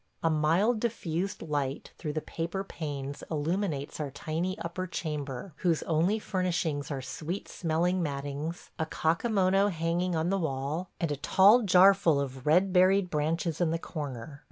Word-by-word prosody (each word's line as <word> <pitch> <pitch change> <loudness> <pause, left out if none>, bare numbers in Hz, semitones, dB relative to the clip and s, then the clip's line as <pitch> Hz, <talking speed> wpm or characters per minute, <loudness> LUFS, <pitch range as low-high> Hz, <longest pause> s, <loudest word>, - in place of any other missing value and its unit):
A 165 - +3
mild 170 +10 +2
diffused 195 -4 -2
light 145 -3 -2
through 150 -3 -3
the 155 - -2
paper 170 +4 -3
panes 145 -6 -5
illuminates 160 -1 -2
our 150 -2 -2
tiny 165 +7 -3
upper 180 +1 -4
chamber, 150 -2 -4
whose 170 -3 +1
only 170 +6 +2
furnishings 175 -8 -1
are 135 -3 -4
sweet 155 +8 -5
smelling 175 +2 0
mattings, 145 +2 -4
a 160 - 0
kakamono 195 +3 +2
hanging 170 +1 -1
on 160 +3 0
the 195 - +1
wall, 150 +3 -2
and 165 -3 -1
a 145 - -1
tall 200 - +6
jar 195 -1 +7
full 165 -7 +2
of 135 -1 -4
red 180 +5 +4
berried 185 0 +4
branches 160 +2 -1
in 170 - +3
the 165 - 0
corner. 140 -5 -6
165 Hz, 155 wpm, -29 LUFS, 150-185 Hz, -, jar